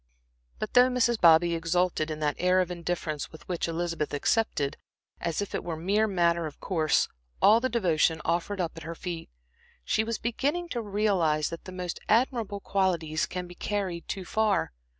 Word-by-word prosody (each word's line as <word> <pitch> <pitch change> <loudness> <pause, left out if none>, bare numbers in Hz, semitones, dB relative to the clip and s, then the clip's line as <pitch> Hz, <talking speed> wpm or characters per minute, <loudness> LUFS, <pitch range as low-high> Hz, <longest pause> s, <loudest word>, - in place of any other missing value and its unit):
But - - -5
though 250 +1 +7
Mrs. 240 -2 +1
Bobby 170 0 +6
exulted 165 -1 0
in 155 -1 -4
that 150 -1 +1
air 180 +1 +3
of 180 -1 0
indifference 170 -4 -3
with 160 - -14
which 175 -2 -2
Elizabeth 165 -3 -2
accepted, 145 -4 0 0.4
as 170 +4 -1
if 200 - -9
it - - -2
were 170 -2 -3
a - - -9
mere 200 +6 +2
matter 170 -4 +1
of 150 - -11
course, 160 -5 +1 0.3
all 220 +2 +6
the 260 +2 -1
devotion 165 -8 +2
offered 175 +4 -1
up 170 -2 -1
at - - -7
her 165 +1 -6
feet, 170 -1 -6 0.6
she 220 - +2
was 225 0 -2
beginning 290 +9 -1
to 240 - -2
realize 195 -8 +1
that 165 - -7
the 185 - -8
most 180 -2 -5
admirable 225 -3 +1
qualities 170 -6 0
can 180 0 -4
be 175 - -11
carried 185 -3 -3
too 190 -2 -4
far. 215 -1 +1
180 Hz, 185 wpm, -28 LUFS, 165-210 Hz, 0.6 s, though